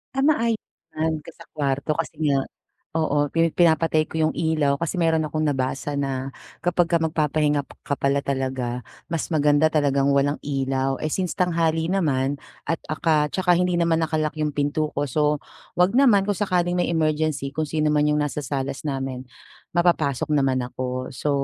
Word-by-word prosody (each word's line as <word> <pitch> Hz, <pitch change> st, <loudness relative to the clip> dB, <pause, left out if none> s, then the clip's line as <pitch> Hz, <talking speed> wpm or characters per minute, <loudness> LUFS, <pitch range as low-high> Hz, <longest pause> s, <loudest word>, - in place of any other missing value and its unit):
Ah 270 Hz, -, +1 dB
maayos 230 Hz, -7 st, +2 dB, 0.4 s
naman 160 Hz, 0 st, 0 dB
kung 155 Hz, +2 st, -13 dB
sa 165 Hz, -, -14 dB
kwarto 140 Hz, 0 st, -1 dB
kasi 165 Hz, -, -3 dB, 0.2 s
nga, 135 Hz, -, +3 dB, 0.6 s
oo 145 Hz, -2 st, +1 dB
pini 165 Hz, +1 st, +2 dB
pinapatay 160 Hz, -2 st, +3 dB
ko -, -, -9 dB
yung 155 Hz, -, +1 dB
ilaw 155 Hz, -3 st, +1 dB
kasi 170 Hz, +3 st, -2 dB
meron 160 Hz, -2 st, +2 dB
akong 155 Hz, +1 st, -2 dB
nabasa 135 Hz, 0 st, -1 dB
na 135 Hz, -1 st, -2 dB, 0.3 s
kapag 175 Hz, -1 st, +2 dB
ka 170 Hz, -, +4 dB
magpapahinga 150 Hz, -2 st, +1 dB, 0.2 s
ka 140 Hz, -, -1 dB
pala 140 Hz, 0 st, +1 dB
talaga 130 Hz, -2 st, -2 dB, 0.3 s
mas 165 Hz, -, -1 dB
maganda 150 Hz, -1 st, +3 dB
talagang 140 Hz, -3 st, +2 dB
walang 145 Hz, +1 st, +1 dB
ilaw. 135 Hz, -1 st, -1 dB
Eh 155 Hz, -, -1 dB
since 185 Hz, -2 st, -1 dB
tanghali 165 Hz, -1 st, +1 dB
naman 140 Hz, -7 st, 0 dB, 0.2 s
at 165 Hz, -, -2 dB
aka 155 Hz, -1 st, +1 dB
tsaka 180 Hz, +1 st, +2 dB
hindi 180 Hz, -1 st, +1 dB
naman 170 Hz, -1 st, +2 dB
naka-lock 155 Hz, -1 st, -1 dB
yung 150 Hz, -2 st, -1 dB
pinto 145 Hz, +1 st, 0 dB
ko, 145 Hz, -, 0 dB
so 150 Hz, +2 st, +1 dB, 0.3 s
wag 180 Hz, +2 st, +4 dB
naman 225 Hz, -8 st, +5 dB
kung 205 Hz, -1 st, -1 dB
sakaling 180 Hz, -3 st, +1 dB
may -, -, +1 dB
emergency 155 Hz, -3 st, 0 dB
kung 155 Hz, +1 st, -2 dB
sino 155 Hz, 0 st, +1 dB
man 150 Hz, 0 st, +3 dB
yung 150 Hz, 0 st, +2 dB
nasa 145 Hz, 0 st, -3 dB
salas 140 Hz, +1 st, -3 dB
namin 135 Hz, -2 st, -4 dB, 0.5 s
mapapasok 155 Hz, -5 st, +1 dB
naman 135 Hz, -3 st, +2 dB
ako. 130 Hz, +1 st, -4 dB
So 145 Hz, +3 st, -3 dB
150 Hz, 170 wpm, -23 LUFS, 140-165 Hz, 0.6 s, naman